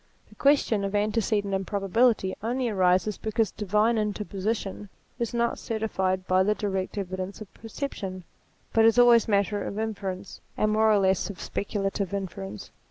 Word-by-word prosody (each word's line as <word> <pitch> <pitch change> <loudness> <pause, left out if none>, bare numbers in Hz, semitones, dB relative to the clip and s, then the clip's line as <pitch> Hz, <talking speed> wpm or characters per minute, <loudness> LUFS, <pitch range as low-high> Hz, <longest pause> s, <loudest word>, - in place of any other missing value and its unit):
The - - -17
question 275 -7 +3
of 195 +1 -2
antecedent 205 -1 0
improbability 195 +2 +1
only 245 +3 -1
arises 190 0 +2
be 220 - -4
cause 220 -2 +1
divine 210 +3 +1
interposition 205 -1 -3 0.3
is 235 -2 -1
not 235 0 0
certified 190 -4 -1
by 185 0 +3
the 210 +3 +2
direct 195 -2 -3
evidence 185 0 -4
of 215 -3 -11
perception, 210 -6 -6 0.5
but 225 - +5
is 225 +1 +5
always 240 -1 +6
matter 205 -1 +1
of 200 - -5
inference, 200 -3 -4 0.2
and 215 - +2
more 220 +1 +4
or 210 - +5
less 190 -1 +2
of 200 - -8
speculative 200 -1 -2
inference. 105 - -6
205 Hz, 155 wpm, -26 LUFS, 190-220 Hz, 0.5 s, always